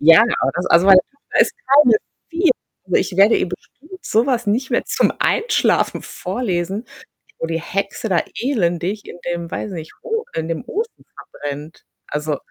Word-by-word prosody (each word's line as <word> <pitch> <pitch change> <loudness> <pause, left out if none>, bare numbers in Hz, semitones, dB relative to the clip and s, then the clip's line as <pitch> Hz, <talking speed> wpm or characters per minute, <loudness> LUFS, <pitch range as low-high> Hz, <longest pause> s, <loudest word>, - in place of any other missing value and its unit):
Ja, 165 +7 +8 0.2
aber 135 - +2
das 180 +1 -2
also, 170 +3 +5
meine 190 -1 +9
Tochter 280 +9 -3
ist - - +4 0.2
keine 270 -5 +7 0.3
4. 340 +2 +2 0.3
Also, - - +1
ich 180 - -1
werde 200 +4 +6
ihr - - 0
bestimmt 310 - -11
so 225 +3 +2
was 245 -4 0
nicht 240 +6 0
mehr - - +1
zum - - +1
Einschlafen 455 -1 +1
vorlesen, 190 0 -3 0.6
wo 165 - -2
die 165 0 -2
Hexe 200 +4 -3
da 175 -3 +3 0.2
elendig 200 -5 -1
in - - -9
dem, 170 -1 -4
weiß 210 - -4
ich 185 - -6
nicht, 160 -1 -8
O 450 -1 -2
in 160 0 -2
dem 165 +4 -3
Ofen 445 - -4
verbrennt. 145 +2 -8 0.2
Also 150 0 -2
195 Hz, 180 wpm, -20 LUFS, 170-255 Hz, 0.6 s, meine